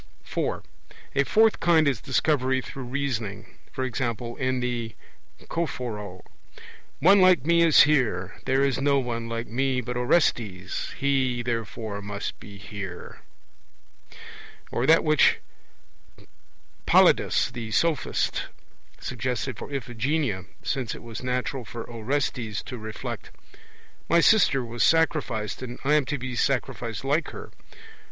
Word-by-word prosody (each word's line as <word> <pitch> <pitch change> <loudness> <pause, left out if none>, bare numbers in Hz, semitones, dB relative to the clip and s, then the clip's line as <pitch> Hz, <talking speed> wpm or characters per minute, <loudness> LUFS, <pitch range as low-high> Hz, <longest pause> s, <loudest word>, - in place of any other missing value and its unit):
(4) - - -3 0.5
A 140 - +3
fourth 220 +5 +4
kind 165 -3 +4
is 130 -7 0
Discovery 130 -1 +1
through 135 0 -7
reasoning; 120 -7 -4 0.2
e.g. 130 0 -2 0.4
in 130 -1 0
The 120 -2 -3 0.5
Choephoroe: 110 - -4 0.8
'One 195 +5 +6
like 185 -7 +5
me 170 +1 +4
is 165 -3 +7
here; 110 -11 +1
there 135 +1 +2
is 135 -1 +1
no 140 0 +3
one 115 -3 -2
like 115 0 -3
me 130 +2 0
but 125 0 -4
Orestes; 115 - 0
he, 130 -3 +1
therefore, 115 -3 -4
must 100 0 -5
be 100 -1 -11
here.' 100 -2 -8 1.5
Or 125 - 0
that 160 +1 +6
which 155 -2 +4 1.5
Polyidus - - +4
the 120 -3 -6
Sophist 155 +5 0 0.5
suggested 125 0 -3
for - - -8
Iphigenia; 125 - -1 0.2
since 125 -5 -2
it - - -11
was 115 -2 -7
natural 125 +1 -2
for 115 +1 -7
Orestes 115 -2 -2
to 125 - -7
reflect: 110 0 -6 0.8
'My 170 - +5
sister 165 - +4
was 120 0 -1
sacrificed, 150 -11 +1
and 125 -1 -6
I 145 +2 +2
am 150 -3 +4
to 145 +3 -2
be 130 0 -5
sacrificed 120 -3 -1
like 150 +5 +1
her.' - - -9
125 Hz, 125 wpm, -26 LUFS, 115-140 Hz, 1.5 s, is